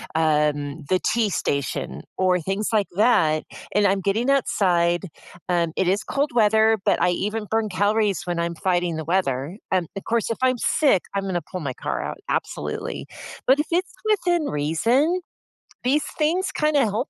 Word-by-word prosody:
um, 150 -1 +1
the 185 - +3
T 225 -2 +1
station" 135 - -2 0.2
or 185 -1 +3
things 195 +5 -2
like 210 -3 +2
that, 165 -9 +3 0.3
and 205 0 +4
I'm 195 0 +1
getting 215 +7 0
outside, 180 -10 +2 0.4
um, 170 -2 +1
it 190 - +1
is 195 +3 +1
cold 285 +1 -1
weather, 220 0 +4
but - - +2
I 180 - +4
even 210 +4 -2
burn 220 +1 +1
calories 205 -1 +1
when 175 -1 -1
I'm 170 0 -1
fighting 175 -1 0
the 160 -1 -5
weather. 160 -2 -1
Um, 185 -3 +1
of 195 - -5
course, 230 -1 0
if 230 - -2
I'm 255 -1 +3
sick, 275 -8 +3 0.2
I'm 200 - 0
gonna 180 -3 -1
pull 185 - -7
my 140 -4 -3
car - - -3
out, - - -5
absolutely. 440 +3 -3 0.4
But 265 - +6
if 300 - 0
it's 360 +2 0
within 350 -6 +2
reason, 235 - +1 0.6
these 275 +4 +2
things 355 +5 +1
kinda 300 -2 +2
help 220 +6 -2
200 Hz, 170 wpm, -23 LUFS, 170-245 Hz, 0.6 s, But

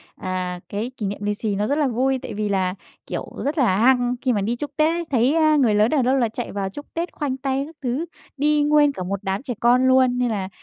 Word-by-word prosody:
à, 185 -1 -4
cái 220 +5 -3
kỷ 210 - -3
niệm 200 +1 -3
lì 210 - 0
xì 210 -1 -2
nó 210 +2 -1
rất 285 - 0
là 295 -3 +2
vui, 260 +2 0
tại - - -6
vì 210 0 -2
là, 185 -2 0 0.3
kiểu, - - -5
rất 295 +4 -1
là 230 -10 +3
hăng 245 +2 +3
khi 255 - +1
mà 205 - 0
đi 230 +4 -1
chúc 290 +3 -5
Tết 310 0 +4
ấy. 340 0 -3
Thấy, 255 +5 +3
ơ, 310 -1 +4
người 235 -7 +3
lớn 215 +3 +3
ở 300 - +3
đâu 255 +2 +2
là 235 -3 +2
chạy 240 +2 -5
vào 195 -1 -3
chúc 290 +9 -9
Tết, 340 +2 -3
khoanh 270 -3 -3
tay 270 0 -1
các 320 +2 -13
thứ. 265 +6 -2 0.3
Đi 295 +1 +2
nguyên 295 -1 +4
cả 185 - -6
một 195 +2 -3
đám 195 +3 -2
trẻ 255 -3 -4
con 250 +2 +4
luôn, 260 -1 +4
nên 250 -1 +1
là 195 -3 -2
250 Hz, 270 wpm, -22 LUFS, 210-285 Hz, 0.3 s, Tết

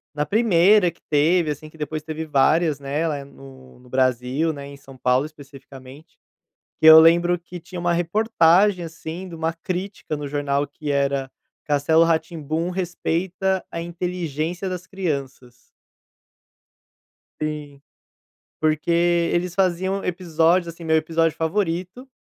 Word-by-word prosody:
na 150 0 0
primeira 200 0 +4
que - - -29
teve, 160 +3 +3
assim, 150 +1 -5
que 160 - -17
depois 155 0 -4
teve 160 0 -5
várias, 155 +1 +2
né, 145 +4 -2
lá 150 -2 -2
é 140 - -7
no 135 -2 -15
no 125 0 -19
Brasil, 130 +4 0
né, 140 -2 -8
em 140 - -10
São 135 -1 -15
Paulo, 125 +2 +2
especificamente. 140 0 -14 0.6
Que - - +4
eu 160 0 +11
lembro 170 +2 +4
que 175 +1 -10
tinha 175 +2 -8
uma 175 0 +1
reportagem, 180 0 +3
assim, 165 +2 -7
de 170 - -9
uma 165 0 -2
crítica 180 0 -5
no 145 -1 -5
jornal 145 0 -1
que 145 +1 -7
era: 140 -1 0 0.4
"Castelo 150 +3 +3
Ra-Tim-Bum 165 0 -1
respeita 185 +1 -2
a 170 - -4
inteligência 175 0 -4
das 180 0 -6
crianças". 140 -10 -4 1.9
Sim. 150 -2 -5 0.8
Porque 155 +1 0 0.4
eles 175 0 -1
faziam 190 +1 0
episódios, 170 0 +1
assim, 170 +1 -12
meu 160 0 +2
episódio 165 0 +1
favorito 185 +7 -2
160 Hz, 140 wpm, -22 LUFS, 145-175 Hz, 1.9 s, eu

